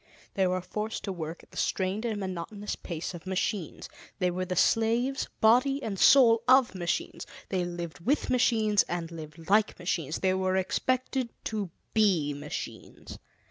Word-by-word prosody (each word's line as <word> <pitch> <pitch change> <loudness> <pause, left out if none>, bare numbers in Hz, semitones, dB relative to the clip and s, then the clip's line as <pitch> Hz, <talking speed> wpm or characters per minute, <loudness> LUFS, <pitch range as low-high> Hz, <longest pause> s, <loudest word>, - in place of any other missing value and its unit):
They 190 -1 +2
were 185 0 0
forced 210 +5 -4
to 200 - -3
work 165 -1 -6
at - - -21
the - - -12
strained 195 +4 -1
and 220 -3 -2
monotonous 195 +2 -4
pace 170 0 -5
of 175 +1 -10
machines; 190 -1 -2 0.3
they 180 -2 +1
were 185 +1 -2
the 180 - -3
slaves, 230 +8 +2
body 255 +5 +4
and 200 -4 -3
soul, 230 -5 +7
of 260 -3 +5
machines; 175 -2 -3 0.2
they 185 -2 0
lived 175 -3 -5
with 260 - 0
machines 220 -4 +3
and 170 -1 -3
lived 160 0 -10
like 210 +2 +3
machines 165 -4 -2
they 185 -1 +2
were 185 0 0
expected 255 +6 0
to 210 -4 -3 0.2
be 185 -10 +3
machines. 145 - -7
190 Hz, 160 wpm, -28 LUFS, 175-225 Hz, 0.3 s, soul